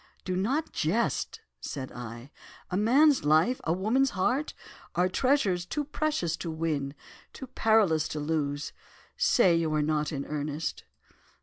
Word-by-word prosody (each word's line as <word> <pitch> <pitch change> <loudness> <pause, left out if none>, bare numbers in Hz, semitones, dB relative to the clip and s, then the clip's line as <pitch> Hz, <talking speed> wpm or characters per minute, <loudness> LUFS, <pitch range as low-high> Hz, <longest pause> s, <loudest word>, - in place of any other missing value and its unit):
"'Do 185 - -1
not 260 - 0
jest,' 165 - -1 0.2
said 130 - -6
I, 120 +2 -9 0.4
'a - - -1
man's 270 +7 +4
life—a 160 +6 +2
woman's 225 +9 +2
heart, 255 +10 0 0.4
are 180 +1 +3
treasures 205 -5 +1
too 295 - -3
precious 295 - -1
to 170 - -5
win—too 160 - -5
perilous 215 -10 +2
to 150 - -4
lose; 150 -1 -2 0.4
say 190 -9 +4
you 165 -2 0
are 150 - +2
not 150 0 0
in 140 -2 -4
earnest? 150 +1 -4
170 Hz, 130 wpm, -28 LUFS, 150-235 Hz, 0.4 s, man's